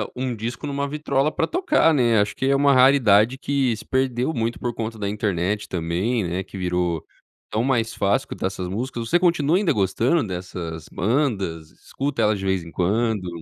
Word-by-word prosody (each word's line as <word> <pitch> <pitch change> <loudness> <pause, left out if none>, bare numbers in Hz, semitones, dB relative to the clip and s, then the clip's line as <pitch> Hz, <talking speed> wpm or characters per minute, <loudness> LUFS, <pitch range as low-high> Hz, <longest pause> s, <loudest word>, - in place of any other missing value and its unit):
um 125 -1 -2
disco 115 +6 -5
numa 140 0 -2
vitrola 150 0 0
pra 160 - -1
tocar, 305 - +2
né. 120 -6 +3
Acho 105 0 0
que - - -2
é 140 - +3
uma 140 0 +4
raridade 125 -3 +5
que 135 -4 0
se - - -11
perdeu 130 +2 0
muito 115 -2 -2
por 120 -1 -2
conta 115 -1 -5
da 100 -1 -2
internet 105 0 -1
também, 95 +7 -1
né, 90 +2 -2
que 95 - -11
virou 90 -3 -1 0.5
tão 110 - 0
mais 120 -4 0
fácil 100 +1 +1
escutar - - -3
essas 95 -1 -5
músicas. 115 +4 -4
Você 175 - +4
continua 170 -2 +2
ainda 195 -3 +2
gostando 115 - +1
dessas 90 -3 -6
bandas? 100 - -1
Escuta 135 -3 -4
elas 105 -1 +2
de 95 - -5
vez 95 -1 +1
em 85 - -11
quando? 105 +2 0
115 Hz, 190 wpm, -23 LUFS, 95-135 Hz, 0.5 s, raridade